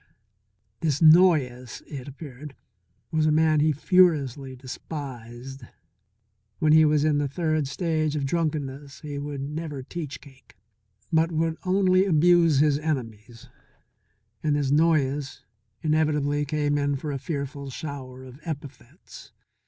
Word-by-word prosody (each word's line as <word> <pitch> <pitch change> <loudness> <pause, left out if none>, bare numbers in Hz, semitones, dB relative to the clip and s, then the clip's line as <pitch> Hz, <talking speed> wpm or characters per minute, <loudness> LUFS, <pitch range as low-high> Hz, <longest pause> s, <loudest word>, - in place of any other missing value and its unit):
This 150 -3 0
Noyes, 155 -7 +4
it 135 -3 -8
appeared, 140 0 -10 0.6
was 155 -1 +2
a - - +3
man 155 0 +3
he 155 +1 +3
furiously 145 - +2
despised. 130 -1 -8 1.0
When 155 -1 +3
he 160 0 +7
was 150 -1 +3
in 150 -2 +2
the 145 - 0
third 155 0 -1
stage 155 0 -1
of 145 -2 -1
drunkenness 145 -3 -3
he 145 -2 -5
would 145 -1 -5
never 150 -1 -5
teach 150 0 -6
Cake, 135 -7 -19 0.6
but 165 +1 +3
would 160 0 0
only 185 0 +3
abuse 170 -2 +4
his 150 -1 +3
enemies, 120 -5 -5 0.9
and 150 -2 +1
this 140 -2 0
Noyes 145 -3 +1 0.4
invariably 150 -2 +1
came 145 0 0
in 145 0 0
for 145 +2 -4
a 140 - -3
fearful 140 -1 -5
shower 130 -3 -7
of 130 +1 -12
epithets. 145 -4 -9
145 Hz, 130 wpm, -25 LUFS, 135-155 Hz, 1.0 s, he